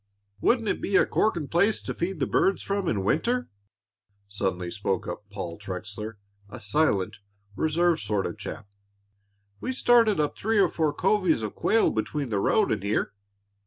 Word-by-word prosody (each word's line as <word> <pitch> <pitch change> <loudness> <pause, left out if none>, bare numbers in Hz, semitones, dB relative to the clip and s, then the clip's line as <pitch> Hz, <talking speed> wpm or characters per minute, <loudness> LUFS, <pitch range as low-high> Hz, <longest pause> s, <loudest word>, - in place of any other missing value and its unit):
"Wouldn't 230 - +2
it - - -1
be 195 - -1
a - - +6
corking 170 -9 0
place 200 +8 +2
to - - -3
feed 175 0 -3
the - - +2
birds 195 - +1
from 200 -2 -1
in 100 -9 0
winter!" 240 - 0 0.8
suddenly 95 -3 -2
spoke 100 -2 -2
up 105 - -7
Paul 95 -4 -6
Trexler, 105 +3 -6 0.3
a 120 - -8
silent, 105 -3 +1 0.4
reserved 165 +2 +2
sort 100 -1 -1
of - - -5
chap. - - -7 0.9
"We - - -3
started 235 -6 +4
up 150 -1 0
three 220 +1 0
or 200 - +5
four 155 -2 0
covies 185 - +2
of 105 - -4
quail 225 - +2
between 135 +5 -2
the 105 -3 0
road 215 - +2
and - - 0
here." 100 0 -1
150 Hz, 165 wpm, -26 LUFS, -, 0.9 s, a